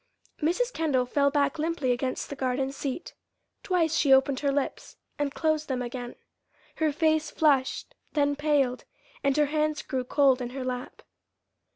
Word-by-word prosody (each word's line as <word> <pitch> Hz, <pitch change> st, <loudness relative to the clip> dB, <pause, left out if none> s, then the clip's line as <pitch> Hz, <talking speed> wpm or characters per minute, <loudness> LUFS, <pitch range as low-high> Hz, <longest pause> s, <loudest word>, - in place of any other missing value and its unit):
Mrs. 460 Hz, +11 st, +1 dB
Kendall 285 Hz, -6 st, +1 dB
fell 280 Hz, +3 st, +2 dB
back 290 Hz, +2 st, +1 dB
limply 310 Hz, -5 st, 0 dB
against 255 Hz, +3 st, -2 dB
the -, -, -3 dB
garden 265 Hz, 0 st, -1 dB
seat. 275 Hz, +4 st, -5 dB, 0.5 s
Twice 330 Hz, -4 st, +1 dB
she 280 Hz, -, +3 dB
opened 265 Hz, 0 st, +5 dB
her 280 Hz, -1 st, +1 dB
lips 280 Hz, 0 st, -3 dB, 0.2 s
and 290 Hz, -1 st, 0 dB
closed 310 Hz, 0 st, 0 dB
them 255 Hz, -2 st, -2 dB
again. 245 Hz, 0 st, -6 dB, 0.6 s
Her 315 Hz, -1 st, +2 dB
face 315 Hz, 0 st, +1 dB
flushed, 275 Hz, -4 st, +1 dB, 0.2 s
then 285 Hz, -1 st, +2 dB
paled, 285 Hz, -4 st, +1 dB, 0.4 s
and 275 Hz, 0 st, +2 dB
her 300 Hz, -, +5 dB
hands 305 Hz, -1 st, 0 dB
grew 260 Hz, -3 st, -2 dB
cold 265 Hz, 0 st, +3 dB
in 245 Hz, -, -3 dB
her 265 Hz, -, -3 dB
lap. 250 Hz, -1 st, -5 dB
285 Hz, 160 wpm, -27 LUFS, 260-310 Hz, 0.6 s, opened